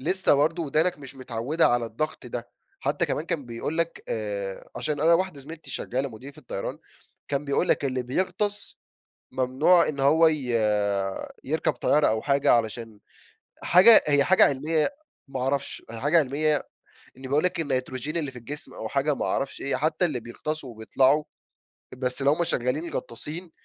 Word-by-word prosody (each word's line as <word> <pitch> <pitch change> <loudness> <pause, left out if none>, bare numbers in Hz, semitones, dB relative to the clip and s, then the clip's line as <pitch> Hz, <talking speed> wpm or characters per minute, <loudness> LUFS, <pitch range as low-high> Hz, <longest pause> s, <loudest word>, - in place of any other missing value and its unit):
لسه 185 +4 +2
برضه 160 +4 +1
ودانك 160 +3 0
مش 140 -1 -11
متعوِّدة 130 +5 0
على 120 -1 +1
الضَّغط 140 +4 -4
ده. 120 -1 -6 0.3
حتى - - 0
كمان 155 - -3
كان 165 -6 -2
بيقول 120 +7 -4
لك 170 0 -1
آآ، 100 -3 -4
عشان 150 -2 -3
أنا 165 +2 +5
واحدة 180 -4 -1
زميلتي 155 +4 -11
شغالة 130 +3 -3
مضيِّفة 130 +4 -12
طيران، - - -4 0.5
كان 140 0 -1
بيقول 140 +5 0
لك: - - +2
"اللي 130 -2 -1
بيغطس، 190 - -2 0.5
ممنوع 135 +7 +3
إن 140 -2 -3
هو 155 +4 +5
ي 160 - +2 1.1
يركب 155 +3 0
طيارة."، 150 +1 +2
أو 110 0 0
حاجة 140 -1 +3
علشان 115 -2 -1 0.6
حاجة 190 +6 +8
هي 145 -1 +3
حاجة 190 +4 +7
علميَّة 150 +3 +2 0.4
ما 135 -1 -5
أعرفش، 135 +2 -2
حاجة 145 +9 +2
علميَّة 150 +1 +2 0.6
إني 130 0 -9
بقول 145 +3 +1
لك 180 -1 0
النيتروجين 135 +1 -2
اللي 150 -5 -3
في 125 - -10
الجسم 145 +6 -9
أو 110 - -6
حاجة 140 +3 +1
ما - - -3
أعرفش 135 0 -2
إيه، 140 - 0
حتى 155 +5 0
اللي 145 -8 -2
بيغطسوا 140 +5 -5
وبيطلعوا 130 +6 +2 0.7
بس 125 +1 -3
اللي 135 - +3
هُم 160 +3 +1
شغالين 150 +3 -2
غطَّاسين، 160 +9 -5
140 Hz, 160 wpm, -25 LUFS, 130-160 Hz, 1.1 s, حاجة